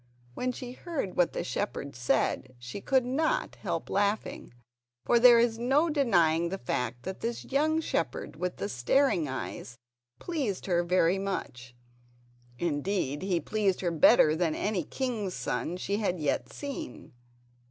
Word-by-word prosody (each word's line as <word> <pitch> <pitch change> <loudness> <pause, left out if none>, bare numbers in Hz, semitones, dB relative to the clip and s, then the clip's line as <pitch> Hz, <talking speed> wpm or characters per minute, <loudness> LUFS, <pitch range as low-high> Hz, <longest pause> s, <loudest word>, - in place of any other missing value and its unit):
When 250 - -1
she 245 0 -7
heard 270 - -4
what 175 -1 +2
the - - -2
shepherd 125 +2 -3
said 130 +1 0
she 125 +10 -7
could 260 +1 +2
not 320 - 0
help - - -3
laughing, 205 +2 -1 0.5
for 240 - +4
there 240 0 +8
is 230 -1 +2
no 280 +7 +2
denying 170 - +3
the 195 - -3
fact 120 -4 -3
that 190 0 -5
this 235 0 -4
young 310 +4 +1
shepherd 165 - -2
with 180 +3 -3
the - - -3
staring 175 - +2
eyes 130 -2 -6 0.4
pleased 275 - -3
her 175 -2 +2
very 180 +1 +2
much; 125 -11 -5 0.8
indeed 150 -2 -1
he 185 -3 0
pleased 205 -2 0
her 175 -2 0
better 155 -1 +6
than 160 -2 0
any 200 -4 -1
king's 220 - -3
son 175 - -2
she 200 +2 -2
had 190 -5 -1
yet 150 -3 -1
seen. 280 - -7
190 Hz, 150 wpm, -29 LUFS, 160-245 Hz, 0.8 s, there